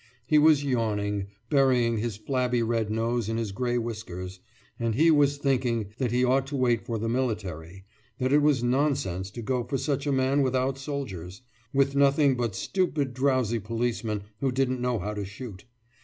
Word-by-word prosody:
He 150 Hz, +4 st, +4 dB
was 150 Hz, -1 st, +5 dB
yawning, 105 Hz, -6 st, -1 dB, 0.2 s
burying 125 Hz, -5 st, +3 dB
his 110 Hz, -2 st, -3 dB
flabby 125 Hz, +1 st, 0 dB
red 115 Hz, -2 st, 0 dB
nose 115 Hz, 0 st, -1 dB
in 115 Hz, -, -1 dB
his 115 Hz, -3 st, -2 dB
grey 120 Hz, +4 st, -1 dB
whiskers; 95 Hz, -6 st, -5 dB, 0.4 s
and 115 Hz, -2 st, 0 dB
he 165 Hz, +5 st, +5 dB
was 145 Hz, -2 st, +3 dB
thinking 120 Hz, -7 st, 0 dB
that 130 Hz, -3 st, +1 dB
he 125 Hz, +1 st, +2 dB
ought 135 Hz, +2 st, +2 dB
to 140 Hz, -, -4 dB
wait 120 Hz, -3 st, +2 dB
for 115 Hz, -2 st, -1 dB
the 110 Hz, +1 st, -2 dB
military; 95 Hz, -8 st, -3 dB, 0.3 s
that 130 Hz, +1 st, 0 dB
it 150 Hz, -, +5 dB
was 145 Hz, -4 st, +3 dB
nonsense 125 Hz, -8 st, 0 dB
to 115 Hz, +4 st, -8 dB
go 125 Hz, +1 st, 0 dB
for 125 Hz, +3 st, -2 dB
such 140 Hz, +1 st, -2 dB
a -, -, +2 dB
man 135 Hz, +1 st, +2 dB
without 130 Hz, 0 st, 0 dB
soldiers, 120 Hz, -, -6 dB, 0.3 s
with 140 Hz, 0 st, +2 dB
nothing 140 Hz, 0 st, +4 dB
but 120 Hz, -5 st, -2 dB
stupid 150 Hz, -, -1 dB
drowsy 130 Hz, -3 st, +1 dB
policemen 115 Hz, -1 st, -2 dB, 0.2 s
who 135 Hz, -1 st, 0 dB
didn't 130 Hz, -1 st, 0 dB
know 125 Hz, -1 st, 0 dB
how 105 Hz, +2 st, -3 dB
to 105 Hz, -1 st, -4 dB
shoot. 100 Hz, 0 st, -9 dB
125 Hz, 180 wpm, -27 LUFS, 110-135 Hz, 0.4 s, was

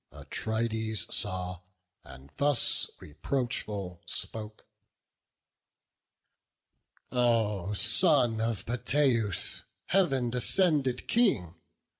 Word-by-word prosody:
Atrides 110 Hz, -1 st, -2 dB
saw, 90 Hz, -3 st, -2 dB, 0.4 s
and 65 Hz, +1 st, -14 dB
thus, 145 Hz, -4 st, +3 dB
reproachful, 100 Hz, -, -3 dB
spoke: 110 Hz, -1 st, -2 dB, 2.5 s
"O 110 Hz, -6 st, 0 dB
son 125 Hz, -, +3 dB
of 115 Hz, -3 st, -2 dB
Peteus, 120 Hz, -, 0 dB, 0.2 s
Heav'n 135 Hz, -11 st, +1 dB
descended 135 Hz, -1 st, +2 dB
King! 200 Hz, -, +1 dB
115 Hz, 65 wpm, -29 LUFS, 105-130 Hz, 2.5 s, thus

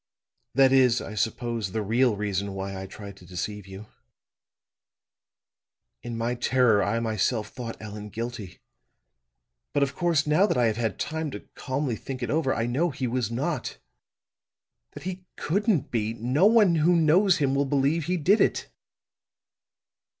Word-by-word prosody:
That 135 Hz, -1 st, +5 dB
is, 130 Hz, -3 st, +4 dB
I -, -, -7 dB
suppose, 110 Hz, -2 st, -2 dB
the 110 Hz, -, -1 dB
real 115 Hz, +2 st, +2 dB
reason 100 Hz, -1 st, -2 dB
why 95 Hz, 0 st, -4 dB
I 95 Hz, 0 st, -6 dB
tried 100 Hz, +1 st, -10 dB
to 95 Hz, -, -16 dB
deceive 95 Hz, +3 st, -5 dB
you. 95 Hz, +2 st, -9 dB, 2.2 s
In 115 Hz, +7 st, -6 dB
my 115 Hz, +2 st, -1 dB
terror 125 Hz, -4 st, +3 dB
I 115 Hz, -, 0 dB
myself 110 Hz, 0 st, -1 dB
thought 120 Hz, -3 st, -7 dB
Allan 105 Hz, 0 st, -8 dB
guilty. 115 Hz, -3 st, -6 dB, 1.2 s
But, 145 Hz, -1 st, +3 dB
of 135 Hz, -, -1 dB
course, 170 Hz, -4 st, +1 dB
now 155 Hz, +7 st, +3 dB
that -, -, 0 dB
I 120 Hz, -, +3 dB
have 110 Hz, -1 st, 0 dB
had 110 Hz, -4 st, -1 dB
time 160 Hz, 0 st, -3 dB
to 105 Hz, -, -9 dB
calmly 130 Hz, -2 st, -2 dB
think 130 Hz, +3 st, -6 dB
it -, -, -2 dB
over, 150 Hz, -3 st, +1 dB
I 115 Hz, -, 0 dB
know 140 Hz, +9 st, +1 dB
he 135 Hz, -2 st, -4 dB
was 120 Hz, -2 st, -1 dB
not 140 Hz, +8 st, -3 dB, 1.2 s
that -, -, -10 dB
he 185 Hz, +1 st, -5 dB
couldn't 200 Hz, -, 0 dB
be! 115 Hz, -1 st, -1 dB
No 125 Hz, -, +3 dB
one 215 Hz, -5 st, +5 dB
who 165 Hz, +3 st, +4 dB
knows 175 Hz, +4 st, +4 dB
him 135 Hz, -2 st, +1 dB
will 140 Hz, +1 st, +1 dB
believe 145 Hz, +3 st, +1 dB
he 180 Hz, +2 st, 0 dB
did 190 Hz, +7 st, +3 dB
it." -, -, 0 dB
125 Hz, 160 wpm, -26 LUFS, 110-150 Hz, 2.2 s, That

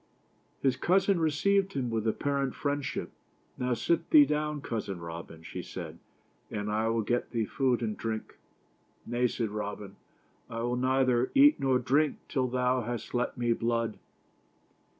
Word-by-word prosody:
His 135 Hz, -2 st, +3 dB
cousin 190 Hz, +1 st, +3 dB
received 190 Hz, +5 st, +2 dB
him 125 Hz, -4 st, -2 dB
with 110 Hz, -1 st, -1 dB
ap 110 Hz, -, 0 dB
parent 140 Hz, -2 st, -1 dB
friendship. 145 Hz, -1 st, -2 dB, 0.2 s
" -, -, -38 dB
Now 125 Hz, -1 st, +1 dB
sit 170 Hz, +8 st, 0 dB
thee 300 Hz, -2 st, +8 dB
down, 150 Hz, -, -1 dB
cousin 105 Hz, -8 st, -4 dB
Robin," 85 Hz, -1 st, -8 dB
she -, -, -6 dB
said, -, -, -8 dB, 0.5 s
"and 105 Hz, 0 st, -3 dB
I 110 Hz, +1 st, +1 dB
will 115 Hz, -1 st, +1 dB
get 120 Hz, +3 st, 0 dB
thee 115 Hz, -3 st, -1 dB
food 125 Hz, 0 st, 0 dB
and 110 Hz, -2 st, -1 dB
drink." 110 Hz, -1 st, -5 dB, 0.3 s
" -, -, -38 dB
Nay" 120 Hz, +1 st, +1 dB
said 115 Hz, -3 st, -2 dB
Robin, 105 Hz, -1 st, -5 dB, 0.3 s
" -, -, -37 dB
I 115 Hz, 0 st, -4 dB
will 120 Hz, +1 st, 0 dB
neither 130 Hz, -1 st, +2 dB
eat 290 Hz, +2 st, +7 dB
nor 135 Hz, -2 st, +3 dB
drink 140 Hz, +4 st, +2 dB
till 130 Hz, -3 st, 0 dB
thou 125 Hz, 0 st, +1 dB
hast 120 Hz, -1 st, -5 dB
let 120 Hz, 0 st, -1 dB
me 120 Hz, -1 st, +2 dB
blood." 115 Hz, -1 st, -1 dB
125 Hz, 170 wpm, -29 LUFS, 115-140 Hz, 0.5 s, thee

